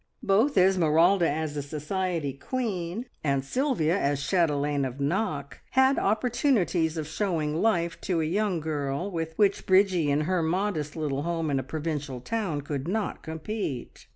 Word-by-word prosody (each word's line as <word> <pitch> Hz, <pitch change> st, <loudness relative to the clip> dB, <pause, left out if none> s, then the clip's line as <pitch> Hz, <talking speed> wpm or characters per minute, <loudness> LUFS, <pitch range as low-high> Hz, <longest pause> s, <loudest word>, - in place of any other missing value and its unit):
Both 215 Hz, +7 st, +3 dB
Esmeralda 180 Hz, -1 st, +4 dB
as 155 Hz, 0 st, -2 dB
a 145 Hz, -, -1 dB
society 155 Hz, +1 st, -2 dB
queen, 200 Hz, -, -3 dB, 0.2 s
and 140 Hz, -2 st, 0 dB
Sylvia 210 Hz, -, +1 dB
as 140 Hz, 0 st, +1 dB
chatelaine 145 Hz, -3 st, +1 dB
of 130 Hz, +1 st, -4 dB
Knock, 145 Hz, -, -2 dB
had 265 Hz, +1 st, +4 dB
opportunities 210 Hz, -, +1 dB
of 155 Hz, -, -2 dB
showing 160 Hz, -2 st, -1 dB
life 170 Hz, -6 st, +1 dB
to 180 Hz, -3 st, 0 dB
a 160 Hz, -, +1 dB
young 190 Hz, 0 st, 0 dB
girl, 150 Hz, +3 st, -2 dB
with 165 Hz, -2 st, -3 dB
which 200 Hz, -2 st, +2 dB
Bridgie 185 Hz, -5 st, +4 dB
in 145 Hz, +1 st, +2 dB
her 180 Hz, +3 st, +1 dB
modest 165 Hz, -3 st, -1 dB
little 145 Hz, -4 st, -2 dB
home 165 Hz, -1 st, -1 dB
in 135 Hz, -, +1 dB
a -, -, -3 dB
provincial 150 Hz, -4 st, -4 dB
town 180 Hz, -, -2 dB
could 140 Hz, 0 st, -4 dB
not 205 Hz, +2 st, -2 dB
compete. 160 Hz, -, -5 dB
165 Hz, 155 wpm, -27 LUFS, 145-195 Hz, 0.2 s, Esmeralda